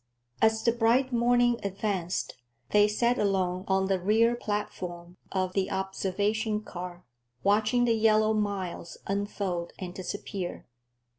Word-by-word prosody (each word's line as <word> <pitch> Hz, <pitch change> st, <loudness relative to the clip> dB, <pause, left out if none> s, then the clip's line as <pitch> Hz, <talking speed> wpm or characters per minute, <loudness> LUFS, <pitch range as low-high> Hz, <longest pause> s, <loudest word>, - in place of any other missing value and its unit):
As 220 Hz, 0 st, +3 dB
the 235 Hz, -, +4 dB
bright 240 Hz, +3 st, +2 dB
morning 240 Hz, 0 st, +3 dB
advanced, 195 Hz, -3 st, -2 dB, 0.4 s
they 210 Hz, 0 st, +6 dB
sat 235 Hz, +4 st, +1 dB
alone 190 Hz, -2 st, 0 dB
on 190 Hz, 0 st, +2 dB
the 190 Hz, -1 st, +1 dB
rear 220 Hz, +5 st, +3 dB
platform 180 Hz, -5 st, -4 dB
of 185 Hz, -1 st, -1 dB
the 190 Hz, -1 st, 0 dB
observation 205 Hz, +3 st, -1 dB
car, 180 Hz, -2 st, -8 dB, 0.4 s
watching 215 Hz, +5 st, +3 dB
the 235 Hz, -, +3 dB
yellow 215 Hz, -1 st, +4 dB
miles 200 Hz, -5 st, -3 dB
unfold 195 Hz, -3 st, -2 dB
and 180 Hz, -2 st, -6 dB
disappear. 185 Hz, 0 st, -5 dB
205 Hz, 125 wpm, -28 LUFS, 185-220 Hz, 0.4 s, they